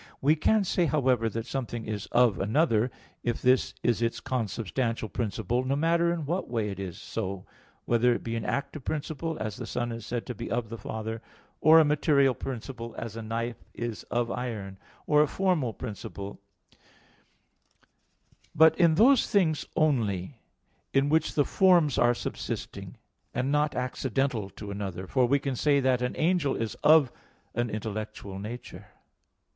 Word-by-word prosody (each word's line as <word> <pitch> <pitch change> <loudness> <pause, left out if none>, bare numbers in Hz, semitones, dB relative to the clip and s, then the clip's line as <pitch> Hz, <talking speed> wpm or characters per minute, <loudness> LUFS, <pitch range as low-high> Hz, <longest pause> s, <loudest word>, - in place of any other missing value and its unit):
We 150 +4 +4
can 210 +7 +3
say, 180 -2 +1
however, 130 -6 +2
that 115 0 -4
something 120 -4 -4
is 105 -2 -4
"of" 120 -6 +3
another, 115 - +2 0.3
if 120 -1 -1
this 130 +1 +2
is 120 -2 +2
its 115 0 0
consubstantial 115 0 -2
principle, 115 +2 -1
no 135 +2 0
matter 170 +3 +2
in 165 -3 -2
what 175 +6 -2
way 110 -4 -1
it 100 - -7
is 95 -2 -5
so, 95 -4 -4 0.4
whether 120 +1 +3
it 120 - -1
be 115 0 -3
an 115 - -2
active 140 +3 -3
principle, 155 +2 -3
as 105 -1 -4
the - - -6
son 120 -1 -2
is 115 -1 -6
said 120 +1 -3
to 125 - -4
be 115 +1 -6
"of" 115 -2 -2
the 115 - -6
father, 110 +1 -5 0.4
or 160 +1 +7
a 160 - +7
material 145 -2 +3
principle, 115 -2 -6
as 115 -2 -5
a 115 - -5
knife 115 +1 -4
is 120 -2 -4
"of" 120 -1 0
iron; 105 -6 -4 0.3
or 150 0 +4
a 150 - +4
formal 175 -7 +1
principle, 100 -3 -7 2.2
but 160 +1 +7
in 170 -3 +5
those 250 - +5
things 165 -7 +2
only 115 - 0 0.6
in 135 +1 +3
which 160 +1 +2
the 145 - +3
forms 175 -7 +4
are 120 0 +4
subsisting, - - -5 0.4
and 130 +2 0
not 150 0 +1
accidental 125 -3 -1
to 100 +1 -8
another, 95 -2 -4
for 125 +5 +2
we 140 +3 +4
can 140 -1 -3
say 140 +3 +3
that 130 -2 +2
an 125 - -1
angel 170 -3 +2
is 115 -2 -2
"of" 150 -5 +6 0.4
an 120 0 -1
intellectual 110 -2 -5
nature. 105 -2 -8
120 Hz, 165 wpm, -28 LUFS, 110-145 Hz, 2.2 s, or